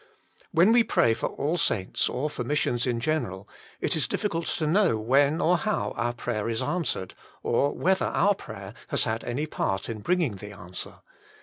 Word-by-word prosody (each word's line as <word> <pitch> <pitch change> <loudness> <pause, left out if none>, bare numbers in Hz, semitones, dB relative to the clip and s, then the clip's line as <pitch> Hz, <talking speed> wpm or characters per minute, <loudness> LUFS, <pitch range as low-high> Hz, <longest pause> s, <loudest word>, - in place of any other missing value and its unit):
When 175 +7 +5
we 235 0 +6
pray 115 - +3
for 115 - -2
all 155 +5 -1
saints, 95 - +1
or 140 +4 -1
for 125 - -4
missions 120 -2 0
in 120 -2 0
general, 115 -9 -2 0.3
it - - +1
is - - +1
difficult 170 -5 -2
to 160 - -1
know 165 - +3
when 140 +8 +3
or 175 +1 +3
how 215 -2 -1
our 120 +1 0
prayer 115 -2 -3
is 115 -1 -1
answered, 165 - -2 0.3
or 140 +4 +2
whether 190 +1 +2
our 205 +3 +3
prayer 95 - -9
has - - +1
had 115 -1 -1
any 130 +6 -2
part 95 -10 -2
in 110 -2 -4
bringing 145 - 0
the 105 +1 -9
answer. 90 -1 -6
125 Hz, 185 wpm, -27 LUFS, 110-165 Hz, 0.3 s, we